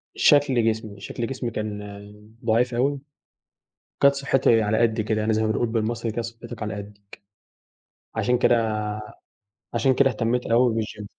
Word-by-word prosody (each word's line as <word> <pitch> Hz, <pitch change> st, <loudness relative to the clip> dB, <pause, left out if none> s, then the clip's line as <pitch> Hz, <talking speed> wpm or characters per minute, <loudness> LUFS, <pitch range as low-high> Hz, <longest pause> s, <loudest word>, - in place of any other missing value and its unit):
شكل 135 Hz, -5 st, +4 dB
جسمي، 110 Hz, -2 st, -5 dB
شكل 115 Hz, +3 st, -4 dB
جسمي 125 Hz, -3 st, -4 dB
كان 105 Hz, -1 st, -4 dB, 0.7 s
ضعيف 120 Hz, +2 st, +2 dB
أوي، 135 Hz, +3 st, +1 dB, 1.0 s
وكانت 140 Hz, 0 st, +5 dB
صحتي 135 Hz, -4 st, +3 dB
على 110 Hz, +1 st, +1 dB
قدي 110 Hz, -1 st, +2 dB
كده 110 Hz, 0 st, -1 dB
يعني 110 Hz, +1 st, +1 dB
زي 110 Hz, +1 st, +1 dB
ما -, -, +1 dB
بنقول 120 Hz, +2 st, 0 dB
بالمصري 115 Hz, +1 st, -2 dB
كانت 115 Hz, +1 st, -3 dB
صحتك 115 Hz, 0 st, -8 dB
على 105 Hz, -, -3 dB
قدك، 100 Hz, 0 st, -9 dB, 1.1 s
عشان 125 Hz, 0 st, +1 dB
كده 110 Hz, -3 st, +2 dB, 0.9 s
عشان 125 Hz, +3 st, +3 dB
كده 135 Hz, -1 st, +4 dB
اهتميت 125 Hz, 0 st, -1 dB
أوي 120 Hz, 0 st, +3 dB
بالgym. 105 Hz, -1 st, -7 dB
115 Hz, 150 wpm, -24 LUFS, 110-125 Hz, 1.1 s, وكانت